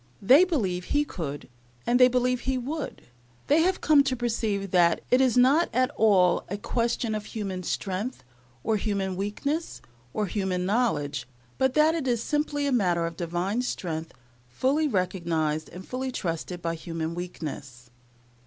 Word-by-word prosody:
They 270 - +6
believe 190 - -1
He 295 0 +1
could, 150 - -6 0.4
and 245 +1 +3
they 250 - +9
believe 250 0 +1
He 265 +1 -1
would. 285 +5 -5 0.4
They 300 +3 +4
have 370 +2 +1
come 300 -2 +6
to 260 -1 0
perceive 220 -5 -2
that 175 -2 +4
it 250 +1 +5
is 255 -2 +3
not 275 +7 +5
at 255 +3 +2
all 190 -5 +4
a 200 - -3
question 235 +1 -1
of 210 -1 -3
human 195 -5 -4
strength, 195 +7 -3 0.4
or 220 - +1
human 195 -2 -2
weakness, 280 - -3 0.3
or 210 - -1
human 190 -2 -1
knowledge, 145 - 0 0.3
but 265 -1 +2
that 305 +1 +5
it 320 -5 -2
is 235 -2 +1
simply 295 -1 -1
a 280 - +1
matter 180 -8 +2
of 165 0 -4
Divine 175 +7 -1
strength, 165 -9 -4 0.4
fully 270 - +1
recognized 170 - -1
and 185 +2 -10
fully 260 +1 -3
trusted 175 -3 -4
by 165 0 -1
human 165 0 -4
weakness. 145 -8 -7
210 Hz, 160 wpm, -26 LUFS, 175-255 Hz, 0.4 s, they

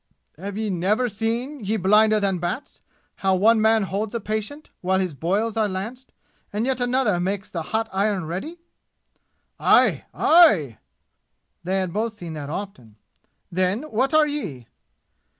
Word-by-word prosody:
Have 200 +4 -6
ye 215 -2 -2
never 200 +8 +1
seen, 235 +5 -3
ye 215 +3 0
blinder 215 +3 +4
than 195 -3 0
bats 175 - -5 0.4
how 190 -1 +2
one 220 +4 +4
man 220 0 +4
holds 205 +4 -3
a - - 0
patient 220 +8 -5
while 190 +1 +1
his 185 -4 -1
boils 195 - -1
are 215 -2 +1
lanced, 225 +8 -6 0.4
and 210 +3 -1
yet 260 -1 -1
another 245 -6 +1
makes 195 +2 -3
the 170 - -3
hot 220 +7 -2
iron 195 -2 0
ready?" 190 - -5 1.0
"Aye! - - +4
Aye!" 200 - +4 0.8
They 185 +2 -1
had 185 -3 -2
both 220 +1 -2
seen 175 -5 -8
that 145 -2 -6
often. 150 - -7 0.6
"Then, 185 - 0
what 255 +5 +1
are 310 -1 +6
ye?" 200 - -4
205 Hz, 150 wpm, -23 LUFS, 185-225 Hz, 1.0 s, are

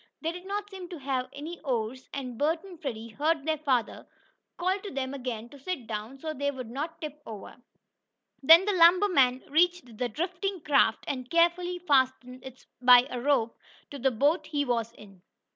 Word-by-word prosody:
They 325 - 0
did 360 +2 -10
not 410 +1 -3
seem 370 -2 -8
to 350 - -7
have 265 -3 -2
any 320 +5 -8
oars, 255 -2 -3
and 255 -3 -5
Bert 320 +7 0
and 365 -4 -12
Freddie 230 -5 -5
heard 295 +5 0
their 315 -1 0
father 260 -6 -1 0.5
call 370 +3 0
to 405 - -7
them 265 -3 -4
again 245 -4 -5
to 285 - -14
sit 285 -3 -4
down, 220 +4 -6
so 310 +3 -5
they 285 0 -1
would 255 -5 -7
not 310 +6 -5
tip 300 -2 -7
over. 210 -3 -9 0.9
Then 325 +6 +8
the 415 - +1
lumber 365 +3 +6
man 260 -7 +3
reached 325 -7 +1
the 245 - -1
drifting 365 - -3
craft, 275 -7 +2
and 255 -3 -4
carefully 345 +1 +2
fastened 260 -6 0
it 260 -1 -12 0.2
by 250 0 +8
a 250 -1 -4
rope 245 -4 +1 0.4
to 285 - -7
the 265 +2 +3
boat 290 +6 +1
he 290 -1 -1
was 230 -3 -1
in. 195 -5 -16
280 Hz, 190 wpm, -28 LUFS, 250-335 Hz, 0.9 s, Then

